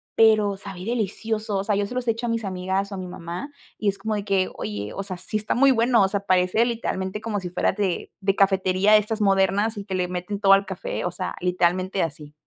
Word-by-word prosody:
pero 215 Hz, -3 st, +4 dB
sabe 195 Hz, -2 st, -8 dB
delicioso, 220 Hz, -1 st, -2 dB
o -, -, -1 dB
sea, 210 Hz, -, +1 dB
yo 200 Hz, 0 st, +1 dB
se 245 Hz, -, -7 dB
los 250 Hz, -1 st, -2 dB
he -, -, +5 dB
hecho 230 Hz, +2 st, -4 dB
a -, -, -1 dB
mis 230 Hz, -1 st, -1 dB
amigas 190 Hz, +1 st, -2 dB
o -, -, -4 dB
a -, -, -6 dB
mi 185 Hz, -, -5 dB
mamá 175 Hz, -, -6 dB, 0.3 s
y 215 Hz, -, -2 dB
es 200 Hz, -, -3 dB
como 215 Hz, +2 st, -2 dB
de 205 Hz, -1 st, -3 dB
que 195 Hz, -2 st, +1 dB
oye, 105 Hz, 0 st, -4 dB
o -, -, -4 dB
sea, 190 Hz, -2 st, -5 dB
sí, 215 Hz, -, -3 dB
está 215 Hz, 0 st, -1 dB
muy 275 Hz, +2 st, +5 dB
bueno, 235 Hz, -2 st, +4 dB
o -, -, +4 dB
sea, 200 Hz, 0 st, -1 dB
parece 185 Hz, +4 st, +3 dB
literalmente 210 Hz, -4 st, -3 dB
como 215 Hz, -2 st, -2 dB
si 180 Hz, -, -5 dB
fuera 175 Hz, -, +1 dB
de 195 Hz, -4 st, -2 dB
de 195 Hz, 0 st, +1 dB
cafetería 190 Hz, +1 st, +3 dB
de -, -, +10 dB
estas 215 Hz, +1 st, -3 dB
modernas 200 Hz, +2 st, +2 dB
y 200 Hz, -, -5 dB
que 190 Hz, -2 st, -3 dB
le 180 Hz, -1 st, 0 dB
meten 180 Hz, +3 st, -4 dB
todo 195 Hz, -, +5 dB
al 195 Hz, 0 st, +4 dB
café, 190 Hz, -2 st, -4 dB
o 175 Hz, -, -1 dB
sea, 180 Hz, +1 st, -4 dB
literalmente 180 Hz, +1 st, +1 dB
así. 150 Hz, -2 st, -6 dB
195 Hz, 255 wpm, -24 LUFS, 185-215 Hz, 0.3 s, de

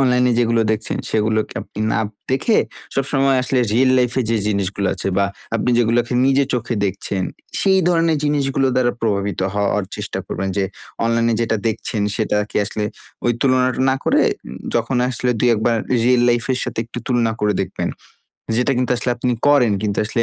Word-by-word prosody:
অনলাইনে 125 Hz, -2 st, +3 dB
যেগুলো 115 Hz, -1 st, +2 dB
দেখছেন, 110 Hz, -, -3 dB
সেগুলোকে 110 Hz, 0 st, 0 dB
আপনি -, -, -13 dB
না -, -, +1 dB, 0.3 s
দেখে, 135 Hz, -, +2 dB, 0.4 s
সবসময় 135 Hz, 0 st, +2 dB
আসলে 130 Hz, 0 st, +1 dB
রিয়াল 130 Hz, +3 st, +4 dB
লাইফ 125 Hz, -2 st, +2 dB
এ -, -, +2 dB
যে, 115 Hz, -, +2 dB
জিনিসগুলো 100 Hz, -1 st, -1 dB
আছে 95 Hz, -, -3 dB
বা 100 Hz, -, +3 dB, 0.3 s
আপনি 125 Hz, -, 0 dB
যেগুলোকে 120 Hz, +1 st, +2 dB
নিজের 135 Hz, 0 st, +3 dB
চোখে 120 Hz, 0 st, -2 dB
দেখছেন, 95 Hz, 0 st, -3 dB, 0.4 s
সেই 190 Hz, -1 st, +4 dB
ধরনের 165 Hz, -2 st, +2 dB
জিনিসগুলোর 135 Hz, -3 st, +1 dB
দ্বারা 120 Hz, -1 st, +2 dB
প্রভাবিত 100 Hz, -3 st, -1 dB
হওয়ার 100 Hz, -1 st, 0 dB
চেষ্টা -, -, -4 dB
করবেন। 95 Hz, 0 st, -3 dB
যে, 100 Hz, -, +2 dB, 0.4 s
অনলাইনে 115 Hz, 0 st, +2 dB
যেটা 115 Hz, -1 st, +1 dB
দেখছেন, 110 Hz, -1 st, -2 dB
সেটা 110 Hz, -2 st, 0 dB
কি -, -, -5 dB
আসলে 105 Hz, +1 st, -3 dB, 0.4 s
ওই 120 Hz, -, +4 dB
তুলনাটা 130 Hz, -2 st, +2 dB
না 130 Hz, -, +2 dB
করে, -, -, +3 dB
উ -, -, -13 dB, 0.2 s
যখন 130 Hz, -, 0 dB
আসলে 125 Hz, 0 st, -1 dB
২ 120 Hz, +3 st, +3 dB
১ 105 Hz, -, -3 dB
বার 120 Hz, -1 st, +3 dB, 0.3 s
রিয়াল 125 Hz, 0 st, +4 dB
লাইফ 120 Hz, -1 st, +2 dB
এর 130 Hz, -, -1 dB
সাথে 125 Hz, -, -6 dB
একটু 120 Hz, +1 st, -7 dB
তুলনা 120 Hz, -3 st, +1 dB
করে 105 Hz, 0 st, +2 dB
দেখবেন। 95 Hz, -, -3 dB, 0.7 s
যেটা 125 Hz, +3 st, +2 dB
কিন্তু 125 Hz, 0 st, 0 dB
আসলে 125 Hz, -, -1 dB
আপনি 125 Hz, +1 st, 0 dB
করেন, 130 Hz, -7 st, +5 dB
কিন্তু 100 Hz, -1 st, 0 dB
আসলে 115 Hz, +1 st, 0 dB
120 Hz, 180 wpm, -19 LUFS, 110-130 Hz, 0.7 s, করেন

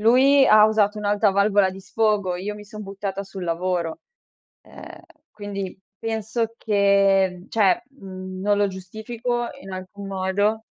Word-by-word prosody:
lui, 265 Hz, +5 st, +5 dB
ha 215 Hz, 0 st, +7 dB
usato 215 Hz, -1 st, +1 dB
un'alta 205 Hz, 0 st, +2 dB
valvola 200 Hz, 0 st, +3 dB
di 190 Hz, -, -10 dB
sfogo, 205 Hz, -3 st, 0 dB
io 205 Hz, +3 st, -4 dB
mi 210 Hz, -, -11 dB
son 215 Hz, 0 st, -9 dB
buttata 195 Hz, 0 st, -5 dB
sul 190 Hz, -1 st, -7 dB
lavoro. 170 Hz, -1 st, -2 dB, 0.6 s
Ehm, -, -, -12 dB, 0.3 s
quindi, 200 Hz, -3 st, -6 dB, 0.2 s
penso 225 Hz, +1 st, -2 dB
che 195 Hz, -3 st, +2 dB
cioè, 210 Hz, 0 st, +2 dB
mhmm, 185 Hz, -6 st, -9 dB
non 205 Hz, 0 st, +2 dB
lo 205 Hz, -, +3 dB
giustifico 225 Hz, +6 st, -4 dB
in 195 Hz, -, -10 dB
alcun 185 Hz, +2 st, -8 dB
modo 195 Hz, +3 st, 0 dB
200 Hz, 140 wpm, -23 LUFS, 190-215 Hz, 0.6 s, ha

